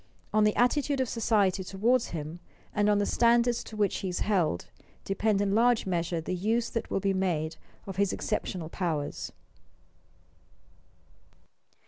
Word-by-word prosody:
On 215 0 +4
the 210 - +2
attitude 275 +3 +2
of 260 - +1
society 205 -5 +1
toward 225 +7 +2
him, 160 +1 -6 0.3
and 210 0 +2
on 205 - +4
the 205 - +1
standards 235 +1 +3
to 215 - -9
which 205 -3 +1
he 190 - -3
is 180 - -3
held, 175 - +1 0.4
depend 200 +1 +1
in 200 -1 +1
large 235 +1 +3
measure 170 -2 -1
the 160 - -4
use 220 +6 0
that 230 - -3
will - - 0
be 195 0 +1
made 170 -4 -1 0.3
of 195 -2 -7
his 200 -1 +2
exceptional 175 -4 -3
powers. 160 -4 -3
200 Hz, 150 wpm, -29 LUFS, 180-225 Hz, 0.4 s, On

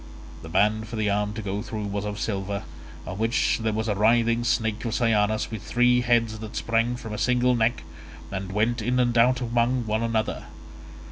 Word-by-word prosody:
The 80 - -9
band 105 +5 +2
for 115 - -7
the 105 -2 0
arm 105 +1 0
to 110 0 -6
go 100 +1 -3
through 110 -1 -5
was 100 0 -3
of 105 0 -4
silver, 100 -2 -3 0.4
on 95 +2 -6
which 115 +1 +1
there 110 0 0
was 110 +1 -2
a 105 - +1
writhing 115 +3 +3
snake 110 -2 0
of 115 -2 -2
cyanus 110 -2 +1
with 110 -3 -5
three 125 0 +3
heads 115 -2 +1
that 110 -1 -8
sprang 115 +1 0
from 115 -3 -7
a 105 - -4
single 125 0 +2
neck, 115 +1 +1 0.5
and 95 -1 -4
went 115 +4 0
in 125 +3 0
and 120 -1 +2
out 125 +2 +4
among 120 +1 +1
one 110 +1 -1
another. 115 -1 -1
110 Hz, 200 wpm, -25 LUFS, 105-120 Hz, 0.5 s, out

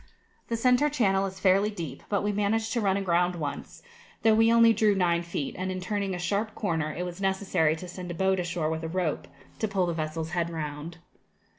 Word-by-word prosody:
The 230 - -1
centre 250 +5 +3
channel 195 -9 +2
is 190 0 -9
fairly 195 +2 +3
deep; 165 -10 -6
but 200 -1 0
we 205 - +1
managed 220 +2 0
to 235 - 0
run 195 -2 +2
aground 180 -2 +1
once, 150 -4 -6 0.4
though 225 - +6
we 225 +1 +5
only 230 -1 +6
drew 215 -2 +3
nine 170 -2 +2
feet, 170 -4 -4
and 185 +1 -3
in 185 - -3
turning 195 0 -2
a - - -4
sharp 200 +5 -1
corner 160 -6 -1
it 175 - -4
was 180 +2 -7
necessary 190 -5 +1
to 180 +3 -8
send 180 0 -7
a 175 - -4
boat 190 +1 +1
ashore 175 -3 -1
with 160 0 -3
a 160 - -3
rope, 175 -3 -2 0.3
to 220 - 0
pull 195 -2 +1
the 170 - -1
vessel's 160 0 -3
head 170 -1 0
round. 155 0 -5
185 Hz, 220 wpm, -27 LUFS, 170-205 Hz, 0.4 s, though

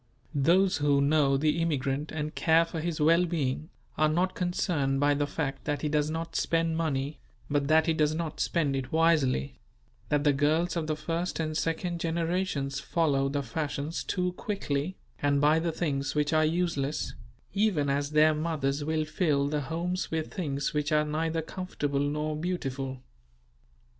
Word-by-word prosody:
Those 175 +7 +3
who 145 -1 +3
know 140 -1 +3
the 155 +3 +1
immigrant 145 -2 -1
and 155 0 -3
care 165 +1 +4
for 165 0 -5
his 165 0 -3
well 165 +3 +5
being, 155 -3 -2 0.3
are 155 0 +4
not 180 +4 +1
concerned 160 -6 0
by 145 +1 +4
the 145 0 0
fact 145 -2 -3
that 145 0 -2
he 150 - +1
does 150 0 +1
not 165 +1 -4
spend 165 -1 +1
money, 150 -3 -1 0.3
but 145 -1 +1
that 160 +1 +4
he 165 - +2
does 155 -1 +1
not 160 -2 -4
spend 150 -5 +1
it 130 -1 -4
wisely; 155 - +2 0.5
that 145 -1 +2
the 145 -1 +4
girls 155 +6 +1
of 165 -2 -2
the 155 - 0
first 170 +3 -3
and 155 -1 -2
second 170 +2 -1
generations 165 -4 -1
follow 140 -4 +1
the 140 0 -1
fashions 145 +4 -3
too 180 0 -1
quickly, 180 -4 -3 0.2
and 145 0 +2
buy 150 +2 +4
the 165 0 -1
things 140 -5 -2
which 150 +1 +1
are 155 0 +4
useless; 155 -3 -1 0.4
even 195 -8 +2
as 140 +1 0
their 155 +1 +5
mothers 150 -3 -1
will 155 +1 0
fill 150 -3 +1
the 150 0 -1
homes 170 +5 -2
with 160 -1 -3
things 145 -6 -2
which 150 0 -1
are 150 0 +3
neither 160 +2 -1
comfortable 150 -5 -3
nor 150 +2 -1
beautiful. 135 -6 -3
155 Hz, 170 wpm, -28 LUFS, 145-165 Hz, 0.5 s, well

